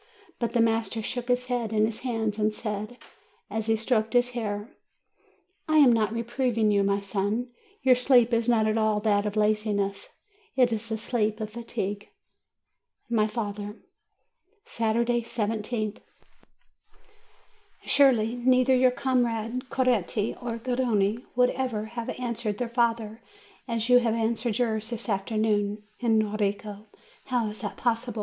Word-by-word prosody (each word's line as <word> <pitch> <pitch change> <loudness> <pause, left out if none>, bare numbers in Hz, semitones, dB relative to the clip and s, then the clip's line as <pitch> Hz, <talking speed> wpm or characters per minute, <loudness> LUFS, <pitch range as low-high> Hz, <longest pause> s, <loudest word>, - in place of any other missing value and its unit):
But 235 - -2
the 235 - +3
master 225 -1 0
took 245 +2 -3
his 250 0 +1
head 245 -3 -2
in 215 -1 +3
his 220 0 -4
hands, 225 -4 -2
and 215 0 +2
said, 215 +2 -5 0.5
as 220 0 -3
he 225 - +3
stroked 220 -1 0
his 245 0 +3
hair: 210 -2 -4 0.9
"I 310 - +4
am 275 -5 +7
not 220 -2 +1
reproving 230 -1 0
you, 200 -1 +3
my 200 0 +1
son. 205 +5 -2 0.3
Your 260 -1 +6
sleep 245 -1 +4
is 230 +1 +2
not 225 -2 +3
at 215 +1 +1
all 215 -1 +2
that 205 -1 +2
of 205 - -4
laziness; 210 -2 0 0.4
it 250 -3 +3
is 225 +1 -4
the 220 - -1
sleep 215 -1 -1
of 215 -1 -4
fatigue." 210 -3 -4 1.0
MY 215 -2 +3
FATHER 210 -2 -4 0.9
Saturday, 235 - 0
I7th. 215 -1 -3 1.9
Surely, 245 -5 +4
neither 255 +1 +4
your 255 0 +5
comrade 245 -1 -1
Coretti 230 -5 0
nor 235 -2 -3
Garrone 230 -4 0 0.2
would 250 0 +4
ever 250 -5 -2
have 235 -1 -4
answered 235 -4 -3
their 245 - -2
fathers 230 -2 0 0.5
as 230 -2 -1
you 250 0 +7
answered 230 -1 0
yours 220 -3 -1
this 235 -1 -6
afternoon. 210 0 0 0.2
Enrico! 215 -2 0 0.4
How 245 -3 +1
is 210 +2 -9
it 205 - -4
possible? 235 -1 -1
225 Hz, 140 wpm, -27 LUFS, 215-245 Hz, 1.9 s, am